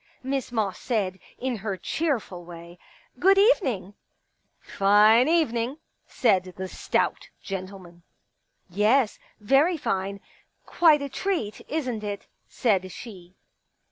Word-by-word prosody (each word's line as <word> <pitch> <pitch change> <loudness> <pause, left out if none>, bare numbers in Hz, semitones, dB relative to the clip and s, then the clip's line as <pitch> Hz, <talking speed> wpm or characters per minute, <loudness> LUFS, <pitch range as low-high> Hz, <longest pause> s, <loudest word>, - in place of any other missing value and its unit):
Miss 265 -1 -3
Moss 215 -5 -1
said, 195 -6 -2 0.2
in 255 -2 -2
her 200 -2 -4
cheerful 220 - -2
way: 170 0 -12 0.2
" - - -29
Good 390 +2 +5
evening! 265 - +2 0.3
" - - -50
" - - -48 0.2
Fine 210 +5 +6
evening," 265 -5 +1 0.3
said 185 -6 +1
the 190 0 -4
stout - - -1
gentleman. 185 -2 -7 0.7
Yes, 215 +6 +2 0.2
very 275 - +3
fine. 195 -7 -2 0.5
Quite 310 -4 +4
a 280 - -4
treat, 320 - -3
isn't 255 -8 -3
it? 205 -1 -5 0.2
" - - -48
said 190 -6 0
she. 185 -6 -11
215 Hz, 125 wpm, -25 LUFS, 190-270 Hz, 0.7 s, Fine